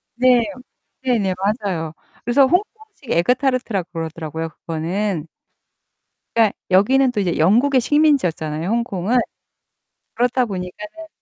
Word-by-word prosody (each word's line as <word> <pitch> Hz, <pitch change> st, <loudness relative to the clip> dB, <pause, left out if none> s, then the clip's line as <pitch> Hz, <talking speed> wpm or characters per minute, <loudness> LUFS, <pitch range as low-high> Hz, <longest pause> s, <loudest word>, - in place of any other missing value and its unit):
네. 250 Hz, -1 st, +4 dB, 0.6 s
네네. 210 Hz, -7 st, +1 dB, 0.3 s
맞아요. 165 Hz, -5 st, -2 dB, 0.3 s
그래서 240 Hz, +4 st, +4 dB
홍콩식 415 Hz, -, -3 dB
에그 170 Hz, +9 st, +3 dB
타르트라고 245 Hz, -9 st, -1 dB
그러더라고요, 160 Hz, -1 st, -5 dB, 0.2 s
그거는. 165 Hz, +1 st, -2 dB, 1.1 s
그러니까 220 Hz, -3 st, +3 dB
여기는 255 Hz, +7 st, +4 dB
또 210 Hz, -, -2 dB
이제 180 Hz, -4 st, 0 dB
영국의 240 Hz, -, +4 dB
식민지였잖아요, 180 Hz, -, +1 dB
홍콩은. 230 Hz, -1 st, 0 dB, 1.0 s
그렇다 245 Hz, +1 st, +1 dB
보니까는 310 Hz, -, -7 dB
215 Hz, 310 characters per minute, -20 LUFS, 175-255 Hz, 1.1 s, 네